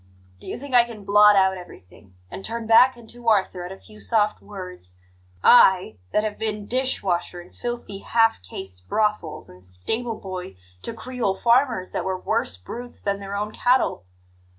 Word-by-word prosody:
Do - - -14
you - - -4
think 275 +1 -9
I 245 -1 +8
can 225 -4 -10
blot 210 +1 +6
out 190 -1 +3
everything, 90 - -15 0.2
and 195 - -8
turn 230 +1 -4
back 245 +3 +6
into 235 0 -4
Arthur 190 -4 +1
at - - -10
a 190 - -8
few 215 +2 -16
soft 215 -2 +1
words 180 - -10 0.5
I, 190 - +6
that 210 - +2
have 215 -1 -4
been 210 -2 -3
dish 255 +3 0
washer 175 -1 -2
in 175 - -14
filthy 240 -5 -5
half 225 - +2
caste 90 0 -10
brothels 210 -7 -1
and 90 0 -16
stable 155 - -4
boy 185 - -7 0.3
to 230 - -6
Creole 230 -4 -2
farmers 235 -3 +2
that - - -2
were 190 -1 -2
worse 220 - -1
brutes 240 - -7
than 200 -1 -2
their 200 0 -6
own 210 +1 -2
cattle? 245 - +1
210 Hz, 175 wpm, -23 LUFS, 185-230 Hz, 0.5 s, I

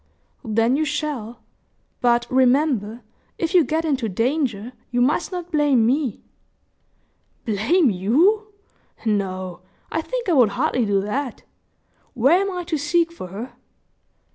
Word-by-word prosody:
"Then 225 +2 +1
you 310 - +1
shall; 295 -7 -4 0.6
but, 240 -1 +2
remember, 255 -4 +2 0.3
if 330 +1 -2
you 355 -3 +6
get 320 +2 -1
into 265 -7 0
danger, 240 - -1 0.2
you 245 - -1
must 290 +8 +1
not 355 -1 -6
blame 290 -7 +3
me." 260 -1 0 1.2
"Blame 240 - +2
you! 315 - +2 0.6
No, 185 -4 -2 0.3
I 320 - 0
think - - -4
I 355 - +2
would 250 -7 +5
hardly 255 -5 +1
do 200 -1 +2
that. 250 +6 -4 0.7
Where 280 - +4
am 395 - -1
I 360 -1 -4
to 330 -3 -2
seek 335 +3 +1
for 335 - -8
her?" 210 +8 -8
260 Hz, 135 wpm, -22 LUFS, 225-315 Hz, 1.2 s, you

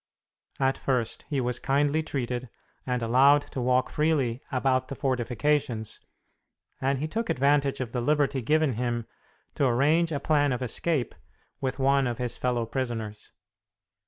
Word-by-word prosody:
At 135 0 +1
first 125 -4 -1
he 145 - 0
was 125 -1 -1
kindly 145 +3 +1
treated 125 -5 -3 0.4
and 125 -2 -1
allowed 135 +5 +5
to 130 - -3
walk 125 +1 +2
freely 145 -6 +1
about 130 -1 +1
the 140 - -6
fortifications, 125 -2 -1 0.8
and 135 +1 +1
he 150 +4 -2
took 225 +7 -3
advantage 140 0 +2
of 125 -3 -4
the 125 - -2
liberty 145 0 +1
given 150 +2 +2
him 120 0 -2 0.5
to 140 - +1
arrange 150 +7 +2
a 145 - -1
plan 145 -3 +2
of 125 +1 -3
escape 130 +2 -1 0.5
with 130 0 -2
one 135 0 +3
of 120 - -3
his 125 -1 -2
fellow 120 -2 -1
prisoners. 115 -4 -4
130 Hz, 150 wpm, -27 LUFS, 125-145 Hz, 0.8 s, allowed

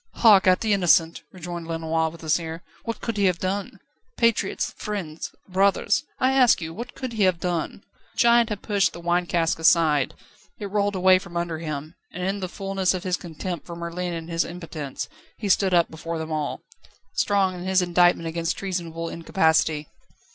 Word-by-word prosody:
"Hark 205 -5 +6
at 185 0 +5
the 220 -2 +2
innocent!" 170 -3 +3
rejoined 175 -2 -7
Lenoir, 160 0 0
with 165 +1 -13
a 160 - -6
sneer. 165 +1 -1 0.2
"What 230 - -4
could 230 -2 -3
he 200 - +2
have 180 -2 +2
done? 195 +2 -3 0.4
Patriots, 230 -4 +1
friends, 180 -7 -5 0.2
brothers, 195 +2 +2
I 260 - +2
ask 255 -3 +5
you, 160 -1 -6
what 235 +6 -8
could 255 -3 -5
he 215 -2 +1
have 185 -2 +2
done?" 175 +2 -3 0.3
The - - -28
giant 235 -1 +5
had 210 -2 -4
pushed 200 -3 +1
the - - -8
wine 175 +1 0
cask 165 -1 +1
aside, 160 -4 +3 0.4
it 200 -2 -6
rolled 205 -1 +1
away 185 0 +5
from 175 -2 -8
under 170 -2 -2
him, 155 -1 -5 0.2
and 180 - -5
in 195 +2 -1
the 185 -2 -4
fulness 195 -1 -1
of 185 - -5
his 185 -1 0
contempt 175 0 -6
for 170 - -7
Merlin 170 +1 -4
and 165 -1 -6
his 165 0 0
impotence, 165 -5 -6 0.3
he 210 - -4
stood 190 0 +3
up 170 -2 +3
before 165 +1 -5
them 160 0 -5
all, 155 -2 -2 0.5
strong 195 -2 +2
in 180 0 -7
his 190 -1 +3
indictment 175 -1 +3
against 165 +1 -2
treasonable 170 -4 -4
incapacity. 160 -3 +1
175 Hz, 190 wpm, -24 LUFS, 165-195 Hz, 0.5 s, Hark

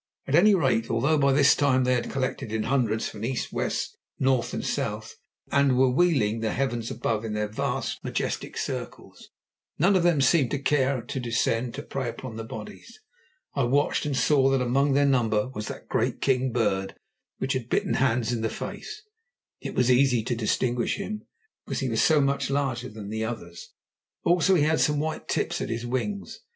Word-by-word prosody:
At 135 - -4
any 200 +6 +6
rate, 130 -9 +1
although 135 +7 +2
by 140 -1 +4
this 140 +1 +5
time 130 -3 +2
they 125 0 +2
had 125 - -1
collected 130 -4 -3
in 110 -1 -1
hundreds 115 -5 0
from 105 -1 -8
east, 120 +1 -3
west, - - -2 0.2
north, 130 -2 +1
and - - -4
south, - - -3 0.4
and 140 -2 +3
were 130 0 +4
wheeling 130 -8 +2
the 110 -1 -1
heavens 120 -4 -2
above 115 -1 -2
in 110 -1 -4
their 105 0 -1
vast, 105 - -3
majestic - - -3
circles, - - -6 0.5
none 185 +6 +4
of 185 - +4
them 170 -3 +3
seemed 135 -1 +3
to - - -1
care 135 -2 +1
to 125 +3 -4
descend 115 0 -1
to - - -6
prey 135 -3 -3
upon 115 0 -7
the 115 - -5
bodies. 110 - -10 0.5
I 135 -3 +1
watched, 145 +4 +1
and 140 -3 -1
saw 135 -2 +4
that 135 0 +2
among 135 +3 +2
their 140 +1 +4
number 120 -4 +2
was 105 -5 -6
that - - -8
great - - 0
king 130 -1 +1
bird 100 -5 0 0.4
which 130 - -1
had 125 -3 -4
bitten - - +1
Hans 125 -3 +1
in 115 - -2
the 110 - 0
face; 430 -1 -7 0.6
it - - -6
was 125 0 +3
easy 125 -2 +3
to 120 - -1
distinguish 120 +2 0
him, 210 +1 -6 0.4
because - - -4
he 130 - -1
was 110 -1 +1
so 155 -2 +4
much 140 0 +1
larger 135 -3 -1
than 105 -1 -8
the 110 0 -2
others. 110 -7 -6 0.5
Also, 180 +2 +4
he 155 - +3
had 155 +1 +2
some 150 -1 +2
white 155 +1 -2
at - - -30
the - - -1
tips - - -1
of - - -3
his 115 +1 -3
wings. 165 +12 -3
130 Hz, 200 wpm, -26 LUFS, 115-140 Hz, 0.6 s, any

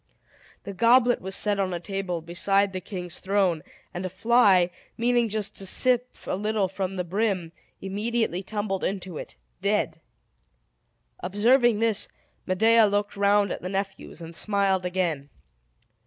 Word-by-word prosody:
The 200 - -6
goblet 240 +4 +4
was 190 +1 -3
set 205 -1 0
on 185 -2 0
a - - -3
table 180 -2 -4
beside 195 +3 +1
the 185 - -4
king's 180 -2 -6
throne; 190 -4 +1 0.3
and 175 - -4
a 185 - -2
fly, 190 -3 +4 0.3
meaning 240 0 +2
just 210 -1 -3
to 195 - -4
sip 250 +4 +2 0.2
a - - -1
little 210 0 0
from 190 0 -4
the 180 - -1
brim, 185 -2 -1 0.3
immediately 205 -1 -1
tumbled 195 -1 -3
into 185 -4 -3
it, - - -8 0.3
dead. - - 0 1.2
Observing 225 +4 +3
this, 225 -3 +1 0.4
Medea 220 +4 +5
looked 205 0 -1
round 200 0 +3
at - - -4
the 180 - -4
nephews, 195 -2 -4
and 165 0 -9
smiled 195 -2 +1
again. 170 -6 -1
195 Hz, 145 wpm, -26 LUFS, 185-215 Hz, 1.2 s, Medea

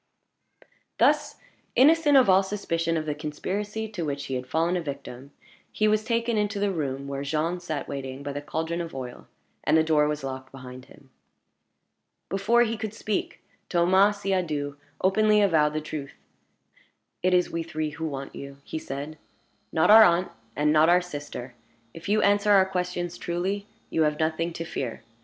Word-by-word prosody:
Thus - - +3 0.4
innocent 295 +1 +5
of 260 - +6
all 190 0 +6
suspicion 165 -4 -2
of 155 - -2
the 150 - -1
conspiracy 200 +9 -4
to 200 -5 -5
which 140 -2 -3
he 135 - -5
had 125 0 -3
fallen 165 +5 +1
a 180 - 0
victim, 140 -3 -7 0.4
he 215 - +1
was 215 0 +2
taken 230 0 0
into 205 0 -1
the 200 0 +1
room 140 -5 -3
where 140 0 -4
Jean 155 +5 -1
sat 160 -4 -4
waiting 135 0 -6
by 140 0 -4
the 145 - -4
caldron 160 +3 -3
of 165 -4 -7
oil, 125 -2 -7 0.4
and - - +3
the 160 - +4
door 155 -2 +3
was 150 -1 -3
locked 130 -1 -6
behind 130 -1 -10
him. 135 0 -19 1.2
Before 230 +5 +3
he 230 -1 -2
could 220 0 -5
speak, 215 -2 -3 0.3
Thomas 190 +4 +3
Siadoux 155 -7 -1 0.3
openly 210 +3 +4
avowed 160 -7 +3
the 155 - -2
truth. 150 -2 -7 1.1
"It 185 0 +3
is 180 - +2
we 165 - -2
three 155 -2 -3
who 160 +1 -4
want 135 -2 -6
you," 140 0 -9
he 160 - -5
said; 145 +2 -6 0.5
"not 160 +5 +4
our 220 +1 +10
aunt, 175 -1 +3 0.2
and 150 +1 +2
not 155 +1 +5
our 180 +1 +5
sister. 145 -7 -7 0.4
If 165 +4 -8
you 210 +1 +3
answer 205 +1 +3
our 195 -2 +6
questions 180 -2 -3
truly, 190 +4 -2 0.2
you 160 - +1
have 150 -1 +2
nothing 160 +2 -1
to 165 - -5
fear. 125 -8 -5
165 Hz, 175 wpm, -26 LUFS, 145-195 Hz, 1.2 s, our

